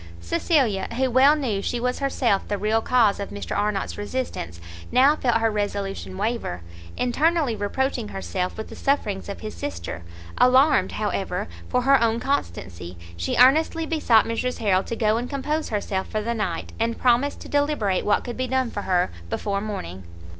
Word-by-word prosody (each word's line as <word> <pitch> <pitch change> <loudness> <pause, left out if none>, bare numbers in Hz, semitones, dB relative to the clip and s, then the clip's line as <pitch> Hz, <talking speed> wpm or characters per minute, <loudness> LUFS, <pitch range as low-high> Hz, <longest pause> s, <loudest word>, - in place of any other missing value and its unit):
Cecilia, 205 - +1
who 260 -1 +1
well 270 +4 +6
knew 235 -10 -1
she 240 - -2
was 250 +1 -1
herself 255 -7 +1
the 205 - -1
real 215 +3 +1
cause 225 -5 +3
of 200 - -4
Mr 205 - -5
Arnott's 205 -1 -1
resistance, 205 - -4 0.3
now 275 +4 +5
felt 240 -6 +1
her 225 -1 +1
resolution 200 -2 -3
waver, 205 - -2 0.3
internally 290 +1 +1
reproaching 215 - -1
herself 95 - -3
with 220 - -6
the - - -9
sufferings 210 -9 -1
of 200 - -6
his 215 - -6
sister; 285 - -5 0.4
alarmed, 260 +4 +4
however, - - -2 0.2
for 250 -1 +1
her 275 0 +5
own 230 0 +2
constancy, 90 - -3 0.2
she 85 0 -2
earnestly 315 +6 +4
besought 295 -9 +3
Mrs 240 +2 -2
Harrel 195 -4 +2
to 230 - -4
go 220 -1 +2
and 245 +2 -3
compose 300 +3 -2
herself 200 -3 -2
for 215 -1 -3
the 235 +2 -1
night, 200 -7 -3
and 230 0 0
promised 255 +3 +2
to - - -9
deliberate 285 -10 +1
what 210 - +2
could 240 - -6
be 255 0 -1
done 260 -1 0
for 205 - -4
her 180 - +1 0.2
before 200 - -2
morning. 95 - -5
230 Hz, 175 wpm, -24 LUFS, 200-260 Hz, 0.4 s, well